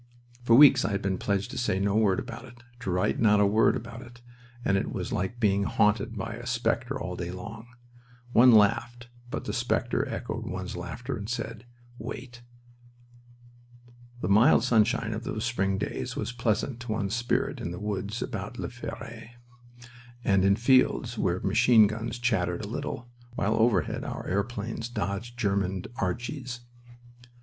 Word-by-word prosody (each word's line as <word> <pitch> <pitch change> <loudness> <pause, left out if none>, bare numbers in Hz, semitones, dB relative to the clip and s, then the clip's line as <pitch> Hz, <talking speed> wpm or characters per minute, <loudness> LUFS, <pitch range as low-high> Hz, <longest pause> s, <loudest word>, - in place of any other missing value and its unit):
For 115 -1 +4
weeks 135 -1 +8
I 105 - -1
had 100 - -2
been 95 -2 -1
pledged 100 +3 -1
to 130 - -4
say 105 -6 0
no 100 +1 +1
word 105 -4 +3
about 115 - -7
it, 120 -1 -15 0.2
to 115 - -5
write 90 0 +1
not 105 -2 +5
a 105 - +5
word 110 +3 +4
about 115 +1 -7
it, 120 -1 -13 0.5
and 95 - +3
it 95 - -1
was - - -4
like 95 +6 -2
being 100 -3 +2
haunted 105 +2 +1
by 110 +3 -4
a 120 +1 -8
specter 120 -1 -1
all - - -4
day 85 - -4
long. 110 +5 -8 0.7
One 125 +2 +8
laughed, 120 +3 +3 0.2
but - - -4
the - - -3
specter - - 0
echoed - - -4
one's 95 0 -5
laughter 90 +10 -5
and 105 -1 -6
said, 115 -1 -5 0.3
"Wait!" 120 -1 -7 1.8
The - - -1
mild 110 +7 +5
sunshine 115 -2 +2
of 110 +2 -5
those 110 0 -3
spring 95 -5 0
days - - -4
was - - -3
pleasant 120 +1 -1
to 120 -2 -6
one's 105 0 -1
spirit 120 0 -1
in - - -3
the 90 - -6
woods 105 +1 -3
above - - -5
La - - -4
Fere, - - -8 0.9
and 95 -4 +3
in 100 +1 +5
fields 120 0 +3
where 90 -4 0
machine 110 +2 +5
guns 115 +3 -3
chattered 110 -6 0
a - - -6
little, 120 +1 -5 0.3
while 105 +1 +1
overhead 110 -6 +1
our - - -5
airplanes 110 +3 -3
dodged 115 +3 -4
German 100 -4 0
"Archies." 120 +5 -3
110 Hz, 165 wpm, -28 LUFS, 100-120 Hz, 1.8 s, weeks